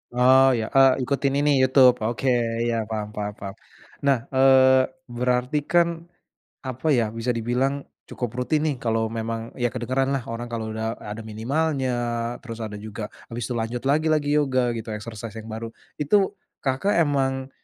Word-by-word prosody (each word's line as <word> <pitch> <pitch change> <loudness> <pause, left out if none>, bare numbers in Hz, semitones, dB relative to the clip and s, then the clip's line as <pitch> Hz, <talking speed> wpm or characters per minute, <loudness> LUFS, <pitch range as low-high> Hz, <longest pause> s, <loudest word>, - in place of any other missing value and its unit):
Oh 130 +2 +6
iya 110 -1 -3
eee, 135 -1 +5
ikutin 140 +1 0
ini 145 -2 +3
YouTube, 130 -1 +5
oke 120 +4 -1 0.3
iya 115 -2 -1
paham 105 -1 -4
paham 105 0 -3
paham. 100 -1 -7 0.5
Nah, 130 -4 +3
eee, 130 0 +5 0.2
berarti 125 +3 0
kan 170 0 +4 0.7
apa 130 +3 -5
ya, 115 -4 +2
bisa 115 +2 -2
dibilang 125 +5 0 0.2
cukup 125 - -4
rutin 150 +4 +1
nih 145 - -1
kalo 115 -2 0
memang, 115 0 -4
iya 120 -1 0
kedengeran 130 +2 0
lah 135 - 0
orang 115 +1 -4
kalo 115 -2 -4
udah 110 +1 -2
ada 105 +2 -6
minimalnya, 130 +5 -1 0.6
terus 115 -2 -7
ada 105 -1 -5
juga 105 0 -7 0.2
abis 120 - -3
itu 120 - -2
lanjut 115 +2 -3
lagi-lagi 155 0 +2
yoga 130 -4 +2
gitu, 110 -1 -5
exercise 110 0 -7
yang 110 - -11
baru. 115 +1 -6 0.2
Itu 195 +7 +2 0.2
Kakak 135 +10 0
emang 135 -3 0
125 Hz, 160 wpm, -24 LUFS, 115-135 Hz, 0.7 s, Oh